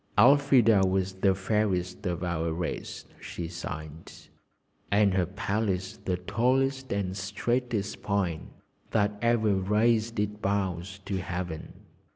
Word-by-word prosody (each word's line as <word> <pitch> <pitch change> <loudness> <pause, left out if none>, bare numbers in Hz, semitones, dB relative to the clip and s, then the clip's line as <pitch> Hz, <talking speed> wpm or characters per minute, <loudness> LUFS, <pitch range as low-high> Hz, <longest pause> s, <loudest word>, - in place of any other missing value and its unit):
"Elfrida 125 -3 +6
was 95 0 +1
the 95 0 +2
fairest 95 -2 -1
of 90 0 -2
our 85 -2 -1
race," 85 +1 -4
she 85 - -6
sighed, 80 -2 -7 0.8
"and 100 -1 +4
her 90 -2 +1
palace 95 -1 -2
the 90 -1 0
tallest 130 +7 0
and 95 -2 -1
straightest 105 +2 -2
pine 95 -6 -1 0.4
that 105 -2 +2
ever 115 -3 +3
raised 110 +3 +2
its 105 0 -1
boughs 95 -2 -2
to 95 - -2
Heaven. 85 -3 -5
100 Hz, 120 wpm, -28 LUFS, 90-110 Hz, 0.8 s, Elfrida